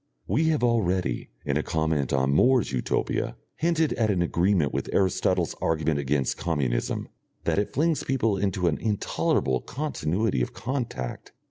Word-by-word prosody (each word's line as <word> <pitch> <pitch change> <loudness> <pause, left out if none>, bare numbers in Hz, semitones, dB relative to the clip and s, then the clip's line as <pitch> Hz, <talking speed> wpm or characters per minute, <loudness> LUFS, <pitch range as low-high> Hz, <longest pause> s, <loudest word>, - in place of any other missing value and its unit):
We 160 - +1
have 155 -5 +1
already, 95 -7 +1 0.2
in 70 0 +1
a - - +1
comment 80 -4 0
on 65 0 +2
More's 125 - +4
Utopia, 65 -2 -1 0.2
hinted 165 -2 +1
at 110 -2 +1
an 90 -4 +2
agreement 85 -3 +2
with - - -2
Aristotle's 95 -2 +1
argument 80 -2 +1
against 70 -1 0
communism, 70 -8 -1 0.4
that - - +1
it 105 - -1
flings 160 +3 +1
people 120 -6 +1
into 95 -2 -1
an 80 - 0
intolerable 100 - 0
continuity 110 - -1
of - - -2
contact. 115 - -4
95 Hz, 145 wpm, -26 LUFS, 75-115 Hz, 0.4 s, More's